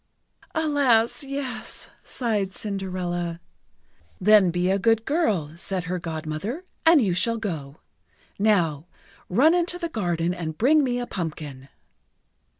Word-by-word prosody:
"Alas! 285 -6 +2
Yes!" 275 -3 -5
sighed 210 -6 -2
Cinderella. 180 -4 -3 0.8
"Then 205 -1 +6
be 175 +2 +1
a 195 - +2
good 225 +2 +2
girl," 205 - 0
said 185 +1 -2
her 180 +1 -3
Godmother, 165 - -4 0.2
"and 325 -5 +7
you 190 -4 +1
shall 230 +6 +1
go. 160 -10 -5 0.6
Now, 175 -8 +2 0.4
run 270 - +5
into 355 0 +1
the 340 -1 -3
garden 175 - -1
and 160 -3 -5
bring 295 +6 +4
me 245 -2 0
a 245 - -2
pumpkin." 150 - -6
195 Hz, 125 wpm, -25 LUFS, 170-245 Hz, 0.8 s, and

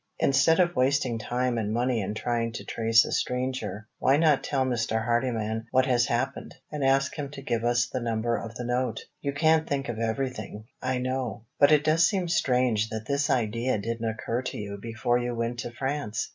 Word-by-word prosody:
Instead 135 +5 +3
of 175 -1 +3
wasting 130 -2 +1
time 125 +2 -1
and 105 -1 -2
money 120 0 +1
in 100 +2 -3
trying 115 0 -1
to - - -7
trace 115 0 +3
a - - -5
stranger, 125 -5 -2
why 135 +2 +4
not 155 -3 +3
tell 135 -2 0
Mr. 115 -3 -1
Hardyman 115 -2 -1
what 130 +1 +3
has 120 -2 +2
happened, 130 +3 -2 0.2
and 150 -2 -3
ask 135 +1 +3
him 140 -1 -3
to 145 0 -9
give 115 -3 -1
us 120 0 +2
the 130 - -4
number 115 0 -1
of 115 -1 -6
the 125 - -5
note? 125 +1 -1 0.2
You 140 - -1
can't 160 +2 +2
think 140 -2 -1
of 115 -2 -4
everything, 110 -2 -3 0.2
I 130 0 0
know; 125 -2 -3 0.2
but 145 +1 +6
it 150 -1 +5
does 165 +2 +4
seem 190 -4 -1
strange 125 -8 +2
that 110 0 -5
this 140 0 0
idea 115 +1 +1
didn't 115 +2 -2
occur 115 +2 -2
to 130 - -5
you 100 -1 -6
before 115 +2 0
you 120 0 -2
went 115 +1 -2
to 120 - -4
France." 130 -4 -3
120 Hz, 200 wpm, -27 LUFS, 115-135 Hz, 0.2 s, but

